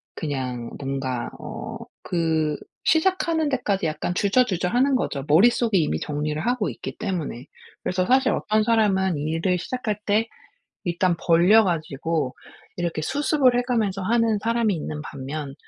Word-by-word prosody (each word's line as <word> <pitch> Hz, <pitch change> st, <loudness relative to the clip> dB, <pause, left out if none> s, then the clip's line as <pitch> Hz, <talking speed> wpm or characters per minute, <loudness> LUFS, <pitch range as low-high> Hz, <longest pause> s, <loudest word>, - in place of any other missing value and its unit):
그냥 130 Hz, -5 st, -4 dB
뭔가 135 Hz, -3 st, -3 dB
어 -, -, -7 dB, 0.3 s
그 160 Hz, -3 st, 0 dB, 0.3 s
시작하는 325 Hz, -2 st, +2 dB
데까지 210 Hz, -, 0 dB
약간 155 Hz, +3 st, -2 dB
주저주저하는 240 Hz, +5 st, +2 dB
거죠 140 Hz, -, -2 dB
머릿속에 220 Hz, +6 st, +4 dB
이미 80 Hz, -, +1 dB
정리를 150 Hz, +1 st, -2 dB
하고 245 Hz, -4 st, +1 dB
있기 -, -, -7 dB
때문에. 160 Hz, -, -4 dB, 0.4 s
그래서 185 Hz, 0 st, 0 dB
사실 260 Hz, +1 st, +4 dB
어떤 215 Hz, +1 st, +1 dB
사람은 195 Hz, -6 st, +2 dB
일을 165 Hz, +4 st, 0 dB
시작할 220 Hz, -2 st, -3 dB
때 215 Hz, +3 st, +2 dB, 0.6 s
일단 175 Hz, 0 st, +1 dB
벌려 180 Hz, +7 st, +6 dB
가지고 160 Hz, -5 st, -1 dB, 0.4 s
이렇게 170 Hz, -3 st, -2 dB
수습을 285 Hz, -, +2 dB
해 -, -, +3 dB
가면서 220 Hz, -6 st, -1 dB
하는 225 Hz, +1 st, +2 dB
사람이 230 Hz, -2 st, +1 dB
있는 150 Hz, -1 st, -5 dB
반면 140 Hz, 0 st, -6 dB
185 Hz, 310 characters per minute, -24 LUFS, 155-230 Hz, 0.6 s, 벌려